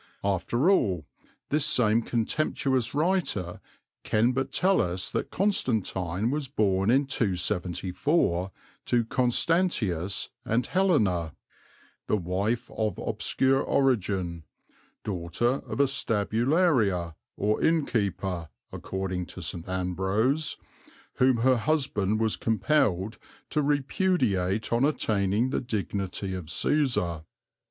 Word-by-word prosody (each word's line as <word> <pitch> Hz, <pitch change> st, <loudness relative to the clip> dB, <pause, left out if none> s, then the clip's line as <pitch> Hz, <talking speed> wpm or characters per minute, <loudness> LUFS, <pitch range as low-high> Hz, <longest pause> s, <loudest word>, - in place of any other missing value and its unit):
After 100 Hz, -, 0 dB
all, 95 Hz, -, +1 dB, 0.4 s
this 150 Hz, 0 st, +2 dB
same 115 Hz, -4 st, +3 dB
contemptuous 125 Hz, +1 st, -1 dB
writer 150 Hz, -, 0 dB, 0.4 s
can 115 Hz, +3 st, +2 dB
but 135 Hz, +1 st, -2 dB
tell 185 Hz, +6 st, +3 dB
us 90 Hz, +1 st, -2 dB
that -, -, -2 dB
Constantine 110 Hz, -, 0 dB
was 145 Hz, -1 st, -2 dB
born 100 Hz, -6 st, +1 dB
in 135 Hz, +4 st, +4 dB
274 90 Hz, -, 0 dB, 0.4 s
to 120 Hz, -2 st, +2 dB
Constantius 120 Hz, -, 0 dB
and 115 Hz, +2 st, 0 dB
Helena, 105 Hz, -, +1 dB, 0.7 s
"the 105 Hz, -, +2 dB
wife 100 Hz, +7 st, -2 dB
of 110 Hz, -4 st, -2 dB
obscure 135 Hz, 0 st, +1 dB
origin 95 Hz, -12 st, 0 dB, 0.6 s
(daughter 105 Hz, +7 st, -1 dB
of -, -, -5 dB
a 140 Hz, -, +6 dB
stabularia, 115 Hz, -, +1 dB, 0.2 s
or 105 Hz, +1 st, 0 dB
innkeeper, 100 Hz, -, 0 dB, 0.2 s
according 95 Hz, -2 st, -4 dB
to -, -, -9 dB
St. 85 Hz, +2 st, -4 dB
Ambrose), 95 Hz, -, 0 dB, 0.6 s
whom 130 Hz, -1 st, +4 dB
her 130 Hz, -1 st, +5 dB
husband 110 Hz, -7 st, 0 dB
was 110 Hz, -1 st, +1 dB
compelled 110 Hz, -2 st, +1 dB, 0.3 s
to 150 Hz, -, +1 dB
repudiate 130 Hz, -, 0 dB
on 120 Hz, +2 st, +2 dB
attaining 110 Hz, -4 st, +1 dB
the -, -, 0 dB
dignity 100 Hz, -5 st, -3 dB
of 90 Hz, -3 st, -5 dB
Cæsar." 90 Hz, -, 0 dB
110 Hz, 105 wpm, -27 LUFS, 95-135 Hz, 0.7 s, a